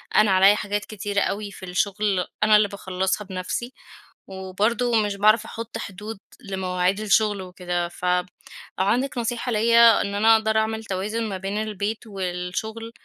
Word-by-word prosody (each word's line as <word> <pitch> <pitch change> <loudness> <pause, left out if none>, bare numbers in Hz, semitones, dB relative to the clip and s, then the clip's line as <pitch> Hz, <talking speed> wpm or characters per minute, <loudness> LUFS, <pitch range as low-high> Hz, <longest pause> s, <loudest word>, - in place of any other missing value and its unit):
أنا 215 -1 +5
عليّا 195 +2 +6
حاجات 205 0 -3
كتيرة 205 -1 -2
أوي 205 0 -2
في 195 - -13
الشغل 190 +1 0 0.2
أنا 215 0 +6
اللي 210 0 +5
باخلصها 190 0 -2
بنفسي، 190 +6 -4 0.5
وبرضه 210 +5 0
مش 205 -1 -2
باعرف 215 +2 +4
أحط 230 0 -6
حدود 210 0 -7 0.2
لمواعيد 190 -2 -1
الشغل 210 -1 +2
وكده. 180 -1 -3
فلو 180 0 0 0.5
عندِك 245 +8 +1
نصيحة 240 +1 -2
ليّا 230 0 +6
إن 200 0 -3
أنا 220 +2 +5
أقدر 220 0 +1
أعمل 220 0 0
توازن 205 +4 -2
ما 195 - -3
بين 195 +2 -4
البيت 215 +1 -4
والشغل 195 +4 -4
205 Hz, 145 wpm, -24 LUFS, 190-220 Hz, 0.5 s, عليّا